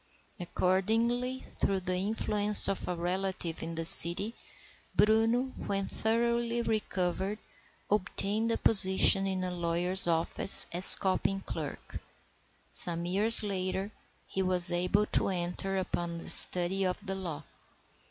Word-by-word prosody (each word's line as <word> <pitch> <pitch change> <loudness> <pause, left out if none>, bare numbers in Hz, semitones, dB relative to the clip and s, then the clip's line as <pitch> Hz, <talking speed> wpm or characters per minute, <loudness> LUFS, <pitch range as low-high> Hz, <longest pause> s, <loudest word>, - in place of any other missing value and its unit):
Accordingly, 225 +9 -4 0.2
through 195 -1 -3
the 185 0 -5
influence 210 +1 +3
of 195 - -6
a 180 - -6
relative 180 -1 -6
in 165 - -9
the 165 0 -6
city, 175 +7 +9 0.6
Bruno, 225 +4 -1
when 195 -1 -5
thoroughly 235 +1 -4
recovered, 195 -2 -5 0.5
obtained 210 +2 -4
a - - -3
position 195 -1 +4
in 190 -1 -6
a 180 - -6
lawyer's 175 +2 -1
office 165 +3 +1
as 175 +2 +6
copying 195 0 -4
clerk. - - -10 0.7
Some 170 -1 +2
years 210 +6 +4
later 190 0 -6 0.3
he 190 - -7
was 180 -1 +1
able 180 +4 -3
to - - -3
enter 185 +1 -4
upon 175 -2 -7
the 165 - -7
study 180 +2 -1
of 185 -1 -4
the 195 - -6
law. 170 -6 -9
190 Hz, 125 wpm, -26 LUFS, 180-210 Hz, 0.7 s, city